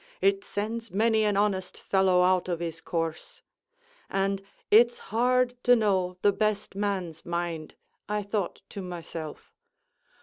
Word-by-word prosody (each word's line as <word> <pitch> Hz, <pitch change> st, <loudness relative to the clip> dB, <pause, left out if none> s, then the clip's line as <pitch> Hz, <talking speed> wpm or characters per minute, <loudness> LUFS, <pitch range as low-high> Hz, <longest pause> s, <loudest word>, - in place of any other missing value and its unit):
it 395 Hz, 0 st, +2 dB
sends 225 Hz, -, -4 dB
many 220 Hz, +3 st, +2 dB
an 205 Hz, -2 st, +2 dB
honest 195 Hz, -3 st, 0 dB
fellow 190 Hz, -2 st, +3 dB
out 185 Hz, 0 st, +2 dB
of 170 Hz, -2 st, -1 dB
his 170 Hz, -2 st, -5 dB
course); 165 Hz, -2 st, -4 dB, 0.7 s
and 195 Hz, 0 st, 0 dB, 0.3 s
'It's 235 Hz, +3 st, +6 dB, 0.2 s
hard 250 Hz, +1 st, +3 dB
to 245 Hz, 0 st, +6 dB
know 190 Hz, -5 st, +1 dB
the 205 Hz, -, +6 dB
best 215 Hz, 0 st, -1 dB
man's 190 Hz, -5 st, -2 dB
mind,' 170 Hz, -2 st, -3 dB, 0.3 s
I 210 Hz, 0 st, 0 dB
thought 200 Hz, -2 st, -3 dB
to 200 Hz, -, -6 dB
myself. 170 Hz, -3 st, -7 dB
195 Hz, 135 wpm, -28 LUFS, 180-215 Hz, 0.7 s, It's